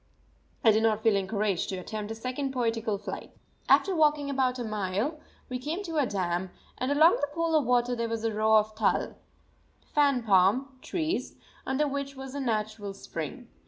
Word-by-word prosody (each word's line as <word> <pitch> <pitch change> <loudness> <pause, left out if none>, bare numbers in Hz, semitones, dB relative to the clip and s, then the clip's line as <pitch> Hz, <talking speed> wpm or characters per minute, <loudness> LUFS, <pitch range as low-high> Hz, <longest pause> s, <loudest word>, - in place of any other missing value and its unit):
I 225 - +7
did 215 +1 +3
not 220 -1 +1
feel 225 -2 +4
encouraged 200 -1 0
to 190 - -3
attempt 210 +3 -5
a 225 - -4
second 255 +4 -3
poetical 225 -4 0
flight. 205 - -8 0.3
After 385 - +5
walking 300 -3 +2
about 260 -2 +1
a 245 - -3
mile 215 - -2 0.3
we 255 -1 -4
came 315 +9 -3
to 330 -4 -4
a 285 -4 +3
dam, 180 -2 -1 0.3
and 255 +2 0
along 315 +4 +5
the 290 - +1
pool 330 -1 0
of 295 -6 +2
water 245 0 +2
there 235 -1 -2
was 225 -1 -3
a 225 -1 0
row 220 +1 +3
of 215 0 +3
tâl 215 0 +1 0.8
(fan 280 -4 +3
palm) 220 +7 +3
trees, 335 0 -2 0.3
under 270 +3 +1
which 280 0 -4
was 265 0 -8
a 285 - -4
natural 215 -5 -2
spring. - - -6
240 Hz, 185 wpm, -28 LUFS, 215-280 Hz, 0.8 s, I